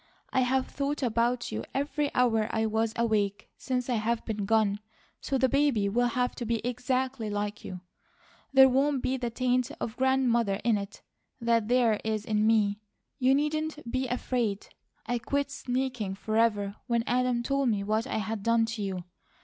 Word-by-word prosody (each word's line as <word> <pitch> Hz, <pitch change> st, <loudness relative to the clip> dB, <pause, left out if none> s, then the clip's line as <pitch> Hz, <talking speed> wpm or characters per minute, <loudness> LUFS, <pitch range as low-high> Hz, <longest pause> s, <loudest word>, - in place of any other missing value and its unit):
I -, -, +3 dB
have 260 Hz, +1 st, +2 dB
thought 280 Hz, 0 st, -3 dB
about 240 Hz, +1 st, 0 dB
you 110 Hz, +1 st, -3 dB
every 290 Hz, +1 st, 0 dB
hour 225 Hz, -4 st, +3 dB
I 220 Hz, 0 st, 0 dB
was 220 Hz, +1 st, 0 dB
awake 210 Hz, -4 st, 0 dB
since 250 Hz, -2 st, -2 dB
I 245 Hz, -3 st, +1 dB
have 225 Hz, +2 st, -1 dB
been 210 Hz, -3 st, -3 dB
gone; 210 Hz, -1 st, +2 dB, 0.4 s
so 270 Hz, -, -1 dB
the 260 Hz, 0 st, +3 dB
baby 275 Hz, -7 st, +2 dB
will 245 Hz, +4 st, +2 dB
have 250 Hz, +1 st, 0 dB
to -, -, -4 dB
be 230 Hz, 0 st, +1 dB
exactly 250 Hz, -1 st, -1 dB
like 205 Hz, 0 st, -3 dB
you. 180 Hz, -1 st, -7 dB, 0.7 s
There 265 Hz, -1 st, +8 dB
won't 270 Hz, +1 st, +1 dB
be 260 Hz, +1 st, 0 dB
the 245 Hz, -2 st, -2 dB
taint 250 Hz, +1 st, 0 dB
of 225 Hz, -, -4 dB
Grandmother 240 Hz, -6 st, +2 dB
in 230 Hz, -2 st, +3 dB
it 200 Hz, +1 st, -9 dB, 0.4 s
that 230 Hz, -2 st, +1 dB
there 235 Hz, -3 st, +3 dB
is 220 Hz, -1 st, -2 dB
in 215 Hz, 0 st, +1 dB
me. 210 Hz, -2 st, +3 dB, 0.4 s
You 260 Hz, +1 st, +4 dB
needn't 300 Hz, -2 st, -2 dB
be 260 Hz, 0 st, -1 dB
afraid. 240 Hz, -4 st, -2 dB, 0.4 s
I 245 Hz, 0 st, -1 dB
quit 280 Hz, +3 st, -1 dB
sneaking 250 Hz, -7 st, -2 dB
forever 210 Hz, -1 st, 0 dB
when 235 Hz, -2 st, +1 dB
Adam 250 Hz, -1 st, +1 dB
told 275 Hz, +1 st, +1 dB
me 205 Hz, -3 st, 0 dB
what 215 Hz, +2 st, 0 dB
I -, -, -2 dB
had 220 Hz, 0 st, -3 dB
done 230 Hz, +1 st, +3 dB
to 225 Hz, -1 st, -5 dB
you. 190 Hz, -3 st, -3 dB
235 Hz, 175 wpm, -28 LUFS, 215-260 Hz, 0.7 s, There